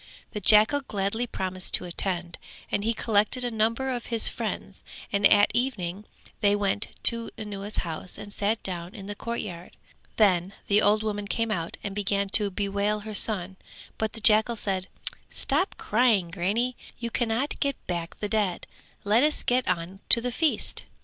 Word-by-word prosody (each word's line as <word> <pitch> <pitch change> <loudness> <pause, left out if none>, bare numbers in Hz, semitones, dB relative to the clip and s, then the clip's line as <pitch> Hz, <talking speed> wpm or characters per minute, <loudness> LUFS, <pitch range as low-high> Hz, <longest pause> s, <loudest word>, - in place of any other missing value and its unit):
The 210 - -4
jackal 215 +9 +6
gladly 220 0 -2
promised 185 -3 +1
to - - -2
attend, 175 -1 -3 0.3
and 200 - 0
he 225 - +1
collected 220 +2 +1
a 245 - -2
number 230 +4 0
of 245 -2 -4
his 230 -2 +2
friends - - -4 0.3
and 200 0 +6
at 205 -1 +5
evening 210 -6 -2 0.3
they 205 -1 +3
went 205 +1 0 0.2
to 230 -1 +5
Anuwa's 205 -1 -5
house 165 +2 -5
and 205 - -8
sat 215 +2 0
down 175 -1 -5
in 200 -3 -8
the 205 - -4
courtyard. 200 -6 -6 0.4
Then 190 -3 +3
the 205 +1 +3
old 215 +1 +3
woman 205 -1 -3
came 230 +1 -1
out 170 -5 -3
and 200 - -4
began 200 0 -1
to 210 0 +4
bewail 200 +2 -1
her 215 +1 -7
son: 190 -3 0 0.4
but 220 -1 -1
the 225 - -3
jackal 220 +2 +4
said 190 -3 -2 0.4
"Stop 370 - 0
crying, 215 -6 +2
grannie, 210 +8 0 0.2
you 235 -1 -4
cannot 240 +5 -1
get 280 -2 0
back 170 -1 -4
the 210 - -3
dead: 205 -4 -1 0.4
let 210 +4 +4
us 300 +1 +2
get 250 +1 +1
on 175 +3 -2
to - - +7
the 250 +1 -2
feast." 310 +5 0
210 Hz, 170 wpm, -26 LUFS, 195-230 Hz, 0.4 s, to